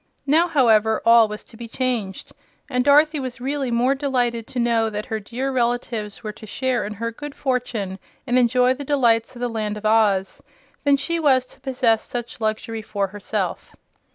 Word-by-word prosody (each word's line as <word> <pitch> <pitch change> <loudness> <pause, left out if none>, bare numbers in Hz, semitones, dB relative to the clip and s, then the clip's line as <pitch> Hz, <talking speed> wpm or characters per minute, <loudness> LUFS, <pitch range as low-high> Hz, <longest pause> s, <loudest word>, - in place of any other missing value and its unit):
Now, 320 +5 +4
however, 220 -8 +3
all 230 -1 +7
was 210 0 -7
to - - -17
be 235 +1 -8
changed, 230 -6 -3 0.4
and 250 -3 0
Dorothy 300 +2 +4
was 255 -1 -5
really 270 +1 -2
more 240 +3 +2
delighted 245 -5 -1
to - - -8
know 230 -2 +2
that 210 0 -4
her 220 -3 -3
dear 245 +6 -4
relatives 235 -4 -2
were 215 - -4
to 215 +1 -13
share 260 +2 -1
in 210 - -5
her 230 +2 -3
good 290 +4 -8
fortune 230 -7 -2 0.3
and 250 +1 +2
enjoy 250 +1 +3
the 280 +2 -7
delights 245 -5 +2
of 240 - -10
the 245 - 0
Land 215 -2 -3
of 210 - -9
Oz, 210 -3 +2 0.4
than 285 -1 +5
she 335 +4 -1
was 265 -5 +3
to 260 - -16
possess 250 -4 +1
such 240 -1 -6
luxury 220 +1 -2
for 200 -2 -2
herself. 205 +1 -3
240 Hz, 185 wpm, -22 LUFS, 220-260 Hz, 0.4 s, all